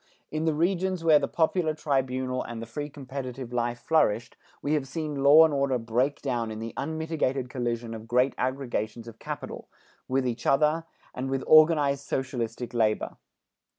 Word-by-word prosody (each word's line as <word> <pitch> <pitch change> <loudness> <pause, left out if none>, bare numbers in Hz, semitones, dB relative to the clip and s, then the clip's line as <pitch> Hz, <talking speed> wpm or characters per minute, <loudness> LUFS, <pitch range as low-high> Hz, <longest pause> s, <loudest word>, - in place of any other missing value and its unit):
In 155 +1 -2
the 160 - +2
regions 185 +2 0
where 155 -2 +6
the 140 - -1
popular 160 -1 +1
tribunal 130 -3 -1
and 120 -1 -6
the 115 - -5
free 145 +6 -5
competitive 130 -3 -7
life 120 0 -1
flourished, 120 -7 +1 0.2
we 145 - -1
have 145 -3 0
seen 150 -1 -4
law 150 +4 +8
and 160 - 0
order 140 -2 +1
break 120 +5 -1
down 120 -5 -1
in 110 - -6
the 115 +1 -6
unmitigated 145 -4 -2
collision 120 -2 -3
of 110 0 -8
great 125 +3 +2
aggregations 120 -4 -3
of 115 -1 -11
capital, - - -6 0.4
with 130 0 0
each 120 0 -3
other 155 +3 +3 0.3
and 130 +1 -4
with 135 0 -1
organized 150 -3 +5
socialistic 120 -2 -3
labor. 110 -2 0
135 Hz, 165 wpm, -27 LUFS, 120-150 Hz, 0.4 s, law